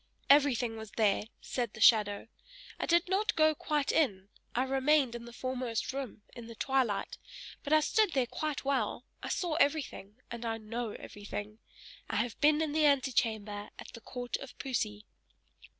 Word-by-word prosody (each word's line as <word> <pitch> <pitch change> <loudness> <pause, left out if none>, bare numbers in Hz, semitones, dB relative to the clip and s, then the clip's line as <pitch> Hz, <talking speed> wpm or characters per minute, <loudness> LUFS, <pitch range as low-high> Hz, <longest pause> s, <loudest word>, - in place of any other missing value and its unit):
"Everything 250 -5 +4
was 220 -1 -8
there!" 210 -2 +3 0.2
said 240 -4 -3
the - - -10
shadow. 210 -2 +5 0.5
"I - - -2
did 340 +1 +3
not 395 +4 +1
go 310 0 +5
quite 295 -1 -1
in, 200 -11 +1 0.3
I 250 - +2
remained 270 0 +2
in 235 0 -7
the 235 - -10
foremost 250 -1 -3
room, 260 -6 -6
in 235 -2 -9
the 230 - -9
twilight, 245 -6 0 0.4
but 285 - -5
I 310 0 +6
stood 420 +4 +2
there 265 -3 +2
quite 300 +3 -4
well; 255 -3 0 0.2
I - - -5
saw 350 -3 -1
everything, 280 - 0 0.2
and 235 0 -5
I 225 -1 -2
know 225 0 -4
everything! 205 +1 -7 0.5
I - - -2
have 240 - -1
been 300 +1 +5
in 310 - -2
the 305 0 +4
antechamber 220 -7 0
at - - -10
the 230 - -10
court 245 0 -4
of 275 - -11
Poesy." 215 -6 -2
245 Hz, 170 wpm, -31 LUFS, 220-285 Hz, 0.5 s, I